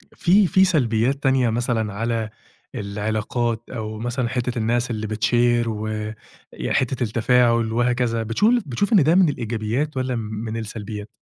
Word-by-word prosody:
فيه 195 +4 +4
فيه 190 +2 +4
سلبيّات 130 -8 +2
تانية 130 -2 +3
مثلًا 115 -2 -1
على 115 +1 -2 0.5
العلاقات 110 +3 -2
أو 110 -3 -5
مثلًا 120 +1 -2
حتّة 125 -1 -2
الناس 120 +2 0
اللي 110 -1 -3
بتshare 120 +2 +2
و 110 -1 -3 0.7
ي - - -4
حتّة 130 -1 0
التفاعل 115 0 +2
وهكذا 120 -1 +1
بتشوف 120 - +2
بتشوف 145 - -1
إن 190 -8 +6
ده 160 +4 +3
من 185 -3 +5
الإيجابيات 120 +3 -2
والّا 130 -1 -1
م - - -2
من 110 +1 -5
السلبيات؟ 105 -1 -6
120 Hz, 150 wpm, -22 LUFS, 110-125 Hz, 0.7 s, إن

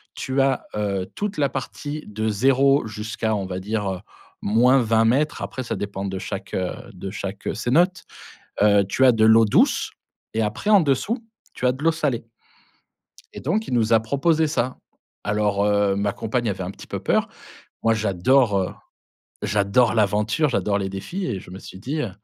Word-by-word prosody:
tu 130 +1 -2
as, 135 -1 +1
heu, 100 -3 -1
toute 205 0 -3
la 140 -2 +2
partie 145 +3 -5
de 110 +1 -2
0, 135 +4 +3
jusqu'à, 110 +1 -3
on 100 -2 -2
va 95 0 -4
dire, 105 +1 -2
heu, 95 - -5 0.4
-20 115 0 +4
mètres. 140 +6 +1
Après 130 - -4
ça 120 - -3
dépend 100 -1 -4
de 95 -1 -3
chaque, 95 +1 -6
heu, 90 -1 -1 0.2
de 95 +1 -7
chaque 100 -1 -5
cénote. 170 - +2 0.6
Heu, 100 -1 +5
tu 130 - +2
as 125 - +7
de 110 -1 +3
l'eau 110 +1 +7
douce 105 - +2 0.4
et 110 - +1
après 105 - -3
en 205 -2 +7
dessous, 195 - 0 0.3
tu - - -6
as 125 - +4
de 130 +3 -9
l'eau 165 - +4
salée 140 -8 -2 1.1
et - - -8
donc 205 +10 -1
il - - -1
nous 115 -1 +2
a 115 - +6
proposé 155 +7 +1
ça. 130 -4 -1 0.5
Alors, 105 -1 +1
heu, 100 -1 +2
ma 100 0 0
compagne 115 +3 -2
avait 95 -1 -4
un 90 - -4
petit - - -12
peu - - -5
peur. - - +1 0.6
Moi 115 - +4
j'adore, 110 +2 +2
heu 95 - -2 0.7
j'adore 105 +4 +2
l'aventure, 105 +8 +2
j'adore 100 -4 0
les 95 -1 -2
défis 135 - -5
et 110 -6 -2
je - - -14
me 95 - -8
suis 95 - -11
dit, 140 +8 -3
heu: 115 - -3
110 Hz, 185 wpm, -23 LUFS, 100-135 Hz, 1.1 s, as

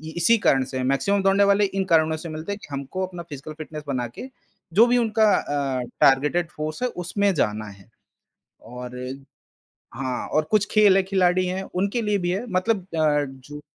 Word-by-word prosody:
इसी 175 +7 +4
कारण 135 -1 +4
से 130 - -6
है। 130 - -2
मैक्सिमम 140 +10 +1
दौड़ने 195 +1 +4
वाले 200 +1 +4
इन 195 0 -1
कारणों 160 -2 +3
से 165 +1 -8
मिलते 155 +5 -6
हैं 200 - -4
कि - - -10
हमको 140 +8 -3
अपना 175 -2 -8
फिजिकल 145 +2 -8
फिटनेस 155 -1 -8
बना 125 -3 -2
के 120 - -9 0.5
जो 225 +5 +7
भी 245 +1 +3
उनका 220 -2 +3
अ, 140 -3 -1 0.2
टारगेटेड 150 +6 +3
फोर्स 155 +6 -5
है - - +2 0.2
उसमें 200 +2 +1
जाना 110 -7 -1
है, 100 +1 -16 0.7
और 125 +2 -9 1.0
हाँ 130 -2 -3
और - - -8
हाँ - - -14
कुछ 210 -1 +3
खेल 210 -3 +5
है 195 - +4
खिलाड़ी 185 -1 +2
हैं, 185 +1 -2
उनके 200 +6 0
लिए 210 -2 +1
भी 175 -1 -1
है 200 +7 -2
मतलब 190 0 0
अ, 150 -2 +2
जो 135 +2 -10
170 Hz, 195 wpm, -23 LUFS, 140-200 Hz, 1.0 s, जो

